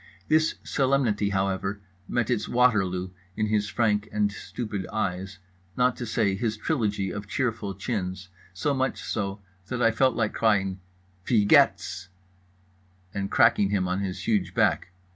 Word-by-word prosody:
This 155 0 +3
solemnity, 130 -7 +1
however, 95 0 -1 0.3
met 120 -1 0
its 115 -4 -1
Waterloo 95 -7 +2 0.2
in 110 - 0
his 105 -1 0
frank 105 -3 +1
and 105 -1 +1
stupid 100 -1 -5
eyes, 95 -2 -3 0.4
not 125 -1 +3
to 120 - -5
say 105 -3 +1
his 110 +2 -2
trilogy 105 - -1
of 105 +2 -6
cheerful 115 -4 -2
chins—so 95 - -4
much 135 0 -1
so 100 -2 -3 0.2
that 125 +2 -3
I 115 - +5
felt 130 +2 +2
like 110 -2 0
crying 95 -4 +1 0.5
"Wie 110 -4 +4
gehts!" 95 -2 +3 1.1
and 100 0 -3
cracking 100 -1 +4
him 95 -2 0
on 90 +1 -1
his 95 -2 -4
huge 95 -5 +1
back. - - +2
105 Hz, 145 wpm, -26 LUFS, 95-115 Hz, 1.1 s, I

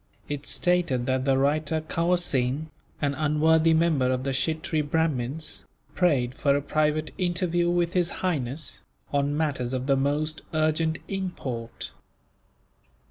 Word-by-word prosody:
It 145 0 -4
stated 175 -9 +1
that 130 0 0
the 135 -1 +3
writer, 150 +3 +1
Kawerseen, 155 -4 0 0.3
an 140 -1 +2
unworthy 155 +2 +3
member 160 -6 +3
of 130 0 -1
the 135 - -1
Kshittree 155 +3 0
Brahmins, 150 -1 -1 0.3
prayed 135 -9 +2
for 140 +1 +2
a 145 - +1
private 155 +1 0
interview 175 -1 +1
with 175 0 +1
His 175 -2 +2 0.2
Highness, 150 -4 -2 0.3
on 145 +1 +1
matters 135 -5 -1
of 130 0 -2
the 140 0 +3
most 150 +3 0
urgent 155 +1 +1
import. 145 -12 -4
155 Hz, 130 wpm, -26 LUFS, 135-165 Hz, 0.3 s, the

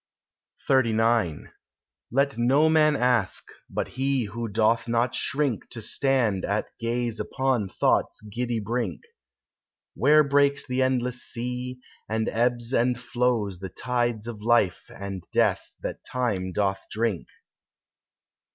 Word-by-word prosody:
XXXIX 115 - +2 0.6
"Let 140 +3 +1
no 130 +7 +4
man 155 -1 +4
ask, 125 -7 +1 0.3
but - - -2
he 135 0 0
who 115 +2 -4
doth 115 +2 +2
not 120 +1 +1
shrink 140 -5 -1
To 120 - -6
stand 115 -5 +1
at 105 +1 -1
gaze 115 0 -2
upon 130 -7 0
thought's - - +1
giddy 115 +2 -3
brink, 115 +3 -2 0.9
Where 155 +1 +5
breaks 140 0 +2
the 130 0 -1
endless 125 -1 +1
sea, 125 +1 -4 0.3
and 110 0 0
ebbs 120 +1 0
and 125 0 +2
flows 120 -6 0
The 95 0 -6
tides 120 -1 -1
of 115 -3 -6
life 105 -7 +2
and 100 -2 -7
death - - +1
that - - -5
Time 105 -8 -2
doth 95 0 0
drink. 110 -5 -1
120 Hz, 125 wpm, -26 LUFS, 110-125 Hz, 0.9 s, Where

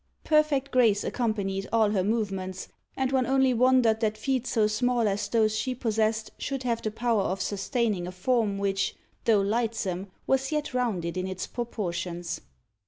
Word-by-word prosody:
Perfect 305 -3 +2
grace 225 -5 +4
accompanied 200 -5 -1
all 220 -2 +3
her 195 -3 +1
movements, 195 -3 -2 0.3
and 265 -1 0
one 260 -2 +2
only 265 -1 +3
wondered 245 -2 +4
that 215 -2 0
feet 255 +2 -1
so 225 -3 +2
small 235 +2 +1
as 200 0 -1
those 215 0 +2
she 255 +4 -1
possessed 220 -2 0
should 270 -2 -3
have 235 -2 0
the 215 - -1
power 230 0 +1
of 190 0 -1
sustaining 200 -1 -1
a - - -5
form 205 +2 0
which, 195 -1 0 0.3
though 220 -3 +4
lightsome, 205 -3 -1 0.2
was 270 +2 +1
yet 300 -2 -2
rounded 190 -9 -1
in 185 0 -1
its 185 -1 -4
proportions. 175 -7 -4
220 Hz, 165 wpm, -27 LUFS, 195-250 Hz, 0.3 s, grace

